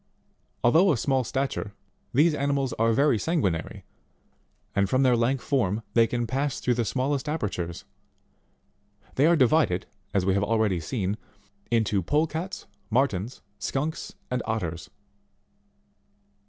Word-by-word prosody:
Although 165 +11 +5
of 140 - +1
small 135 +2 +1
stature, 130 -5 -3 0.4
these 155 +5 +4
animals 140 -2 0
are 115 +1 +4
very 135 -1 +3
sanguinary; 100 - -1 0.9
and 100 -1 +2
from 130 +3 +3
their 125 -2 +5
lank 120 +3 +1
form, 115 -6 0
they 115 -1 +5
can 120 0 -1
pass 135 +3 -1
through 125 - +1
the 120 -1 0
smallest 135 +6 -1
apertures; 95 - -3 1.3
they 140 +4 +4
are 170 - +5
divided, 130 - +3 0.3
as 95 -2 +1
we 95 - +3
have 100 +1 +1
already 110 -5 +1
seen, 100 +1 -2 0.5
into 110 -4 +2
Polecats, 160 - -1 0.2
Mullens, 115 -2 0 0.2
Skunks, 150 +4 -3 0.2
and 125 0 0
Otters. 85 -7 -3
125 Hz, 125 wpm, -26 LUFS, 105-140 Hz, 1.3 s, Although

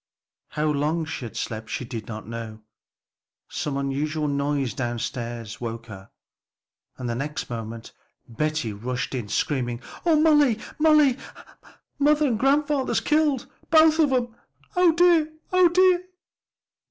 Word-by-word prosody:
How 150 - -1
long 155 +2 0
she 155 -5 -5
had 115 - -8
slept 110 -1 -4
she 125 - -3
did 115 -3 -7
not 110 -2 -7
know; 110 -2 -7 0.9
some 145 -2 -3
unusual 150 +3 -1
noise 140 -2 -1
down 120 -2 -3
stairs 115 -2 -5
woke 115 -1 -5
her, 95 -4 -11 0.9
and 125 - -5
the 120 - -1
next 140 +2 -4
moment 115 0 -6 0.4
Betty 150 -1 -2
rushed 120 +4 -4
in 120 -5 -3
screaming, 120 0 -1 0.2
"Oh, 325 -3 +4
Molly, 295 -7 +4 0.2
Molly, 300 -4 +5 0.8
mother 300 +1 +4
and 235 -6 0
grandfather's 280 +1 +2
killed; 300 -4 +1 0.2
both 315 0 +5
of 300 -4 +4
'em! 240 -3 0 0.4
Oh, 360 -1 +5
dear! 330 -2 +3 0.2
oh, 365 -1 +6
dear!" 365 0 +4
150 Hz, 135 wpm, -24 LUFS, -, 0.9 s, oh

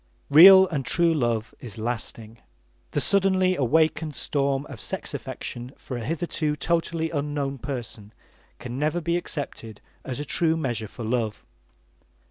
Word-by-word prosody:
Real 190 +5 +10
and 145 -5 -2
true 170 +4 +2
love 120 -6 -1
is 115 -5 -10
lasting. 115 0 -4 0.5
The - - -1
suddenly 190 -2 +3
awakened 155 +2 +1
storm 140 -1 0
of 130 -8 -10
sex - - -4
affection 120 +2 -6
for 130 - -7
a 120 - -5
hitherto 155 +1 -2
totally 165 +1 -1
unknown 145 -2 -3
person 115 -6 -6 0.5
can 125 +1 -6
never 155 +4 0
be 170 0 -1
accepted 140 - -5 0.2
as 130 0 -5
a 145 - -4
true 160 +2 +1
measure 120 -8 -2
for 115 - -9
love. 110 -2 -2
140 Hz, 140 wpm, -25 LUFS, 120-165 Hz, 0.5 s, Real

